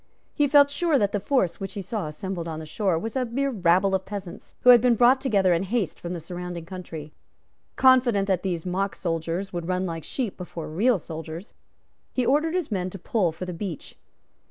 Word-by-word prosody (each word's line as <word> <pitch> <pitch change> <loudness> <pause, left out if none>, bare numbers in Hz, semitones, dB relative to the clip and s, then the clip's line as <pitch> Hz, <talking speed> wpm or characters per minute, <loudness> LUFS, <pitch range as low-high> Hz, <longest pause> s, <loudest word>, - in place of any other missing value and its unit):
He 290 - +2
felt 285 0 +6
sure 320 0 +2
that 205 -4 +1
the 205 - 0
force 200 -5 0
which 195 0 -5
he 200 - -4
saw 205 -3 -3
assembled 170 +3 -5
on 160 -1 -4
the 160 - -7
shore 180 +2 0
was 225 +8 -4
a 260 - +1
mere 270 +4 -1
rabble 190 -2 +3
of 190 0 +1
peasants, 195 -3 -8
who 250 - +8
had 240 -2 +8
been 245 -1 +4
brought 250 +3 +5
together 200 -9 +3
in 170 - +1
haste 195 -3 -2
from 175 +1 -5
the 175 - -4
surrounding 175 0 -6
country. 165 -4 -8 0.6
Confident 245 -6 +4
that 190 -3 +1
these 175 -3 -3
mock 190 +2 -1
soldiers 170 +2 -3
would 170 -1 -4
run 185 0 0
like 165 -3 -4
sheep 240 -8 -3
before 175 -3 -7
real 210 +9 +2
soldiers, 165 +3 -8 0.6
he 255 - 0
ordered 305 +6 +2
his 360 -9 -2
men 185 -2 -1
to 195 - -8
pull 185 -1 0
for 160 +3 -7
the 180 - -5
beach. 175 -3 -6
190 Hz, 210 wpm, -25 LUFS, 170-240 Hz, 0.6 s, who